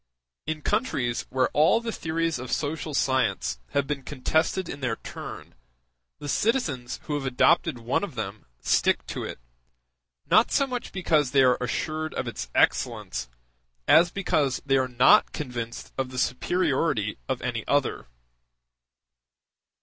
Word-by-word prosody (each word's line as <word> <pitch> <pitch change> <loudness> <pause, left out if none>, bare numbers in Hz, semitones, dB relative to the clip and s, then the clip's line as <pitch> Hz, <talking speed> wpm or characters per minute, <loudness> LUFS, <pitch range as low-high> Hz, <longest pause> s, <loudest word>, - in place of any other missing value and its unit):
In 155 -1 -3
countries 135 - -1
where 130 0 +1
all 155 +9 +4
the 235 -1 -4
theories 165 - -1
of 125 - -6
social 155 0 -2
science 130 - +1
have 140 - +2
been 145 -1 -3
contested 160 +7 0
in 145 - -6
their 125 -4 -1
turn, - - -9 0.6
the 145 - -8
citizens 150 - 0
who 150 - -4
have 145 -2 -2
adopted 125 0 +3
one 120 +10 -1
of 195 -10 -5
them 105 - -5
stick - - +2
to - - -5
it, - - -6 0.9
not - - +4
so 275 - +3
much 250 -2 -5
because 155 -7 +1
they 135 0 +4
are 125 -1 +5
assured 155 +5 -2
of - - -2
its - - -5
excellence, - - +1 0.6
as 170 +2 +6
because 150 -8 0
they 135 -1 +3
are 130 -1 +1
not 125 +1 +5
convinced 120 -5 -5
of 130 -1 -1
the 130 - -8
superiority 130 - 0
of - - -1
any - - -2
other. - - 0
140 Hz, 145 wpm, -26 LUFS, 125-160 Hz, 0.9 s, as